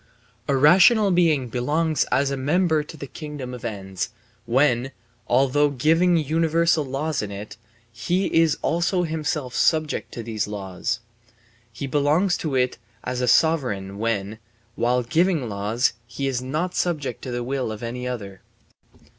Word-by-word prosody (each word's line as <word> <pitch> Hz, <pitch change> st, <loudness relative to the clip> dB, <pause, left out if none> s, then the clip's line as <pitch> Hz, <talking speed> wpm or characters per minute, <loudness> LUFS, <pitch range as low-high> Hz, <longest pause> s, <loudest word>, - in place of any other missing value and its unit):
A 140 Hz, -, +2 dB
rational 195 Hz, -, +6 dB
being 160 Hz, -7 st, +3 dB
belongs 150 Hz, +7 st, 0 dB
as 140 Hz, +1 st, +1 dB
a -, -, 0 dB
member 155 Hz, +4 st, +1 dB
to 155 Hz, +2 st, -10 dB
the 140 Hz, -, -6 dB
kingdom 145 Hz, -3 st, -7 dB
of 125 Hz, -, -8 dB
ends 95 Hz, -5 st, -4 dB, 0.4 s
when, 130 Hz, 0 st, +2 dB, 0.3 s
although 135 Hz, +4 st, +3 dB
giving 165 Hz, +6 st, +3 dB
universal 165 Hz, +1 st, +2 dB
laws 140 Hz, +3 st, -2 dB
in 105 Hz, -, -4 dB
it, 100 Hz, +1 st, -8 dB, 0.4 s
he 175 Hz, -, -1 dB
is 165 Hz, -2 st, +3 dB
also 175 Hz, +2 st, +1 dB
himself 155 Hz, -5 st, -2 dB
subject 155 Hz, +2 st, +1 dB
to 115 Hz, -, -6 dB
these 110 Hz, -3 st, -2 dB
laws. 105 Hz, +3 st, -4 dB, 0.7 s
He 115 Hz, +4 st, -6 dB
belongs 150 Hz, +7 st, +2 dB
to 150 Hz, -4 st, -3 dB
it 125 Hz, -1 st, +1 dB, 0.2 s
as 125 Hz, -1 st, 0 dB
sovereign 115 Hz, -, +1 dB
when, 110 Hz, -1 st, -2 dB, 0.3 s
while 125 Hz, +1 st, +1 dB
giving 165 Hz, 0 st, +1 dB
laws, 105 Hz, +4 st, 0 dB
he 130 Hz, +4 st, -4 dB
is 130 Hz, -2 st, -1 dB
not 155 Hz, +8 st, -2 dB
subject 155 Hz, -6 st, -2 dB
to 130 Hz, -, -6 dB
the 120 Hz, 0 st, -2 dB
will 130 Hz, -2 st, -2 dB
of 110 Hz, +1 st, -7 dB
any 125 Hz, +2 st, -4 dB
other. 100 Hz, -6 st, -6 dB
135 Hz, 145 wpm, -23 LUFS, 120-160 Hz, 0.7 s, rational